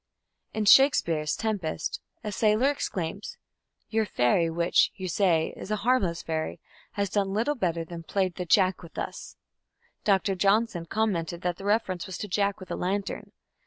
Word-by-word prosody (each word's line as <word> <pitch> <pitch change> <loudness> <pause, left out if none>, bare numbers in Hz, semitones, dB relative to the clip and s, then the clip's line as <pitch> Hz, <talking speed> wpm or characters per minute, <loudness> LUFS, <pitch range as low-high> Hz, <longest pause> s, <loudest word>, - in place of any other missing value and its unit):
In 215 -1 0
Shakespeare's 170 - +5
Tempest 190 -8 -3 0.2
a 210 - -3
sailor 215 +6 +3
exclaims: 195 - -4 0.5
"Your 220 -1 +1
fairy, 165 +4 +2
which, 170 +1 +3
you 190 -1 -5
say, 170 -3 +2
is - - -9
a 215 - +1
harmless 195 -10 +2
fairy, 160 -1 -3 0.3
has 200 -1 -1
done 200 -2 0
little 235 +7 +1
better 170 - -1
than 170 0 -8
played 185 +2 -1
the 180 - -5
Jack 185 +1 +3
with 170 -2 -13
us". - - -6 0.7
Dr. 195 -1 +2
Johnson 195 -2 +1
commented 175 -5 -1
that 175 0 -1
the 195 - -9
reference 205 -4 0
was 190 - -6
to 210 - -5
"Jack 200 +1 0
with 185 - -10
a - - -1
lantern". 195 +2 -3
190 Hz, 160 wpm, -27 LUFS, 170-210 Hz, 0.7 s, Shakespeare's